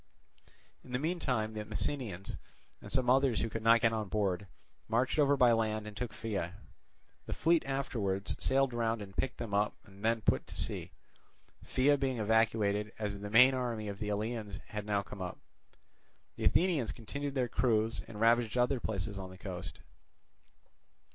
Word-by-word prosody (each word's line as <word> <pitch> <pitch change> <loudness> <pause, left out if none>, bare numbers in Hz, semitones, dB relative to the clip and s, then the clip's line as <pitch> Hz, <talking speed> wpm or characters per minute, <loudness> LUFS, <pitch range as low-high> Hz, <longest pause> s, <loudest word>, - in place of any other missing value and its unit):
In 125 - -11
the - - +2
meantime 135 -8 -1
the 105 -1 -4
Messenians, 105 -3 -3 0.5
and - - -8
some 130 -3 +2
others 130 -2 +4
who 115 - -1
could 115 - -3
not 115 +1 +5
get 115 -1 +3
on 110 -2 -2
board, 100 -2 0 0.4
marched 120 +6 +1
over 145 -1 +4
by 125 -2 +6
land 110 -2 +1
and 105 -1 -8
took 125 +1 -3
Pheia. 100 -5 -3 0.7
The - - -2
fleet 165 -1 +3
afterwards 115 -8 -1
sailed 135 -1 +2
round 115 -2 0
and 95 -1 -12
picked 130 - -1
them 115 -4 -5
up 105 +1 +2
and 100 0 -15
then 115 0 +2
put - - +1
to - - -9
sea; - - -1 0.7
Pheia 140 +2 +3
being 130 -2 0
evacuated, 105 -1 +2
as 105 -2 -3
the 105 0 -6
main 125 +5 +7
army 120 -4 -2
of 100 0 -6
the 105 -2 -3
Eleans 105 -1 -3
had 105 0 -5
now 100 -1 +1
come 100 0 -9
up. 90 -1 -4 1.0
The - - -4
Athenians 165 -10 +3
continued 140 +5 -5
their 125 -2 +1
cruise, 115 -2 +1
and 105 -2 -9
ravaged 115 +1 +3
other 125 +2 +2
places 100 -2 -3
on 95 -1 -6
the 95 - -12
coast. 90 -2 -7
110 Hz, 175 wpm, -33 LUFS, 105-125 Hz, 1.0 s, main